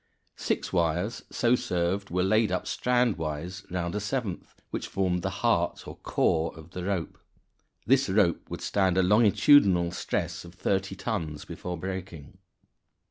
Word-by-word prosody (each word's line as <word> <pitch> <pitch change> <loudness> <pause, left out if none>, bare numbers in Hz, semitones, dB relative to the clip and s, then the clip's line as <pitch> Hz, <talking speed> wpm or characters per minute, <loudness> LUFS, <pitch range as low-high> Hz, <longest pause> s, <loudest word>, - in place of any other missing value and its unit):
Six - - -2
wires 90 +7 0
so 120 0 +2
served 95 -2 0
were 90 +1 0
laid 110 +1 +3
up 90 - -1
strandwise 90 -8 -1
round 85 -1 -2
a 105 - -1
seventh, 105 -2 -4 0.2
which - - -3
formed 90 -2 0
the - - -1 0.2
heart, - - +1
or - - -7
core, 80 +1 0
of 80 +1 -13
the 90 -1 -5
rope. 95 -4 -3 0.7
This 135 -1 +3
rope 95 -4 +2
would - - -6
stand 95 -2 +1
a 95 - +4
longitudinal 100 - +5
stress - - -3
of 85 +1 -13
30 95 +1 -1
tons 85 -8 -4
before 90 -1 -6
breaking. 90 -2 -7
95 Hz, 145 wpm, -28 LUFS, 85-105 Hz, 0.7 s, longitudinal